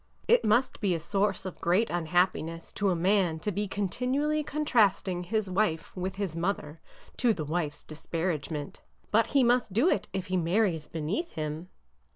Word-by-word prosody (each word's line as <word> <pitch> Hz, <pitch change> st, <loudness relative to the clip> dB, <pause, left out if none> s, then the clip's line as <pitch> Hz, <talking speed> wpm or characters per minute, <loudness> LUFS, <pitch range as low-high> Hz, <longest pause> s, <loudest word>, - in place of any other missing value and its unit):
It 480 Hz, +1 st, +5 dB
must 240 Hz, +5 st, +2 dB
be 190 Hz, -4 st, +2 dB
a -, -, -2 dB
source 195 Hz, +3 st, 0 dB
of 185 Hz, -, -7 dB
great 185 Hz, +7 st, +2 dB
unhappiness 170 Hz, -1 st, 0 dB
to 205 Hz, -1 st, +1 dB
a 180 Hz, -, +2 dB
man 180 Hz, -1 st, +2 dB
to 210 Hz, -, -1 dB
be 205 Hz, +2 st, -2 dB
continually 255 Hz, +10 st, 0 dB
contrasting 210 Hz, -12 st, +1 dB
his 215 Hz, +2 st, -1 dB
wife 180 Hz, -4 st, -1 dB
with 185 Hz, 0 st, -3 dB
his 195 Hz, -5 st, -3 dB
mother, 165 Hz, -3 st, -3 dB, 0.4 s
to 235 Hz, -4 st, +3 dB
the 155 Hz, -, -4 dB
wife's 155 Hz, -1 st, -2 dB
disparagement. 155 Hz, -2 st, -4 dB, 0.3 s
But 225 Hz, +1 st, +4 dB
he 275 Hz, +1 st, +3 dB
must 240 Hz, -4 st, +2 dB
do 255 Hz, -, +4 dB
it 195 Hz, -, 0 dB
if 190 Hz, -2 st, -3 dB
he 185 Hz, -1 st, -1 dB
marries 175 Hz, -2 st, +1 dB
beneath 165 Hz, -, -3 dB
him." 155 Hz, +2 st, -4 dB
185 Hz, 170 wpm, -29 LUFS, 165-215 Hz, 0.4 s, It